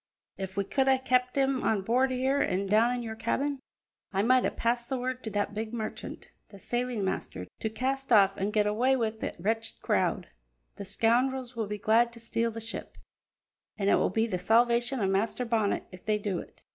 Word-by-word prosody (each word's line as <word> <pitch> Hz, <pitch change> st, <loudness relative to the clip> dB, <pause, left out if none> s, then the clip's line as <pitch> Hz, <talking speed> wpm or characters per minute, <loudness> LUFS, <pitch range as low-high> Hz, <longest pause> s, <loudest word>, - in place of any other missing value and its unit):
If 190 Hz, 0 st, -6 dB
we 200 Hz, -, +2 dB
could 265 Hz, +7 st, 0 dB
hae 265 Hz, 0 st, +5 dB
kept 250 Hz, -1 st, +1 dB
him 270 Hz, -1 st, +2 dB
on 205 Hz, -3 st, +1 dB
board 250 Hz, +6 st, +2 dB
here 260 Hz, +2 st, +1 dB
an' 190 Hz, +1 st, 0 dB
down 215 Hz, +4 st, +4 dB
in 245 Hz, -, -4 dB
your 220 Hz, -1 st, -5 dB
cabin, 270 Hz, +5 st, -1 dB, 0.5 s
I 195 Hz, 0 st, +1 dB
might 255 Hz, +2 st, +4 dB
hae -, -, +3 dB
passed 235 Hz, +1 st, -1 dB
the 265 Hz, -, -1 dB
word 255 Hz, 0 st, -3 dB
to 220 Hz, -, -4 dB
that 205 Hz, 0 st, -1 dB
big 220 Hz, +2 st, -4 dB
miscreant, 220 Hz, -2 st, -6 dB, 0.2 s
the 200 Hz, -, -12 dB
sailing 240 Hz, 0 st, -2 dB
master, 95 Hz, -, -3 dB
to 220 Hz, -, -1 dB
cast 265 Hz, +4 st, -2 dB
off 195 Hz, -3 st, +6 dB
an' 195 Hz, +1 st, -1 dB
get 210 Hz, 0 st, +2 dB
awa' 245 Hz, +6 st, +2 dB
wi' 225 Hz, -3 st, 0 dB
that 220 Hz, -, -5 dB
wretched 225 Hz, +5 st, -2 dB
crowd. -, -, 0 dB, 0.5 s
The 200 Hz, -, -6 dB
scoundrels 245 Hz, +5 st, +1 dB
will 225 Hz, -2 st, -2 dB
be 210 Hz, +1 st, -4 dB
glad 225 Hz, +3 st, +3 dB
to 230 Hz, -, -11 dB
steal 230 Hz, 0 st, -1 dB
the 225 Hz, 0 st, -6 dB
ship, 225 Hz, +1 st, -6 dB, 0.8 s
an' 200 Hz, -2 st, +1 dB
it -, -, +6 dB
will -, -, +2 dB
be 220 Hz, +4 st, +1 dB
the 190 Hz, -6 st, -2 dB
salvation 235 Hz, +6 st, +3 dB
o' 195 Hz, -, +2 dB
Master 210 Hz, +6 st, 0 dB
Bonnet 225 Hz, -3 st, +1 dB
if 185 Hz, -1 st, -12 dB
they 215 Hz, -1 st, +1 dB
do 205 Hz, -4 st, -2 dB
it." -, -, -13 dB
225 Hz, 210 wpm, -29 LUFS, 205-250 Hz, 0.8 s, off